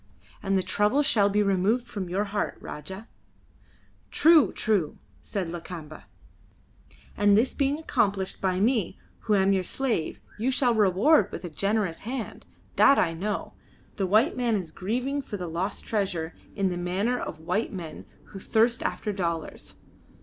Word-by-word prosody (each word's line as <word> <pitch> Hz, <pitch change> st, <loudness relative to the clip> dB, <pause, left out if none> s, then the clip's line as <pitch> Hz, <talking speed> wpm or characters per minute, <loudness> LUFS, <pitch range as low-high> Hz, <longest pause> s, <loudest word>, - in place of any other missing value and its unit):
And 195 Hz, -1 st, +1 dB
the 185 Hz, -, +1 dB
trouble 210 Hz, +11 st, +2 dB
shall 205 Hz, -7 st, +3 dB
be 210 Hz, +1 st, +2 dB
removed 200 Hz, +5 st, +1 dB
from 205 Hz, -7 st, -5 dB
your 190 Hz, +4 st, 0 dB
heart, 205 Hz, 0 st, -2 dB
Rajah." 190 Hz, +8 st, -8 dB, 1.0 s
"True! 320 Hz, -2 st, +5 dB
true!" 200 Hz, -9 st, 0 dB, 0.2 s
said 195 Hz, -5 st, -3 dB
Lakamba. 170 Hz, -3 st, -8 dB, 1.1 s
"And, 205 Hz, -1 st, +4 dB
this 235 Hz, +4 st, +2 dB
being 280 Hz, 0 st, 0 dB
accomplished 200 Hz, -11 st, -1 dB
by 185 Hz, -1 st, 0 dB
me 215 Hz, -3 st, +1 dB, 0.2 s
who 215 Hz, -, +1 dB
am 195 Hz, 0 st, +3 dB
your 190 Hz, -1 st, +1 dB
slave, 230 Hz, -6 st, -2 dB, 0.2 s
you 240 Hz, +4 st, +1 dB
shall 255 Hz, -2 st, +2 dB
reward 210 Hz, -, +4 dB
with -, -, -6 dB
a 175 Hz, -, -6 dB
generous 195 Hz, 0 st, 0 dB
hand. 240 Hz, 0 st, -6 dB, 0.3 s
That 275 Hz, -, +6 dB
I 165 Hz, -2 st, +2 dB
know! 200 Hz, +6 st, -3 dB, 0.4 s
The 195 Hz, -, 0 dB
white 220 Hz, -, +3 dB
man 240 Hz, -3 st, +1 dB
is 180 Hz, -6 st, -3 dB
grieving 250 Hz, -, -2 dB
for 215 Hz, -6 st, -6 dB
the 180 Hz, -, -5 dB
lost 175 Hz, +4 st, -3 dB
treasure, 180 Hz, -6 st, -2 dB, 0.2 s
in 195 Hz, -2 st, +1 dB
the 180 Hz, -, -3 dB
manner 195 Hz, +8 st, -1 dB
of -, -, -5 dB
white 205 Hz, +8 st, -1 dB
men 170 Hz, -5 st, -7 dB, 0.2 s
who 195 Hz, -, -9 dB
thirst 230 Hz, +6 st, +2 dB
after 215 Hz, -8 st, -2 dB
dollars. 170 Hz, -4 st, -4 dB
200 Hz, 155 wpm, -26 LUFS, 185-230 Hz, 1.1 s, That